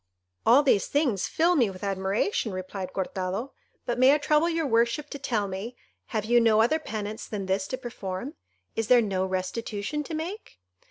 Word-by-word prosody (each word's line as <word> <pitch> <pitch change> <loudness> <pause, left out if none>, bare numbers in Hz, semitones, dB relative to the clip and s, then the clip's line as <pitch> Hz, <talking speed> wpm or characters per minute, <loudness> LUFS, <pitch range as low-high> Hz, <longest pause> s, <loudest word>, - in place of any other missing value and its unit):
"All 260 +5 +7
these 255 -8 +3
things 265 - +1
fill 345 +2 +2
me 240 -9 +3
with 185 0 -10
admiration," 195 - 0
replied 185 0 -5
Cortado; 190 +6 -3 0.3
"but 240 0 -2
may 260 +3 +7
I - - +3
trouble 300 +2 +2
your 330 -1 0
worship 235 +4 +1
to 285 - -6
tell 225 -7 -1
me, 195 +6 -5 0.3
have 215 -2 -2
you 240 +1 +4
no 220 -2 +4
other 240 +8 +3
penance 215 -6 -5
than 200 -3 -4
this 190 +1 0
to 255 - -3
perform? 240 0 -5 0.4
Is 225 -1 -1
there 245 0 +6
no 190 -2 -1
restitution 205 +8 -3
to 325 - -5
make?" 355 +8 -6
225 Hz, 180 wpm, -27 LUFS, 195-280 Hz, 0.4 s, All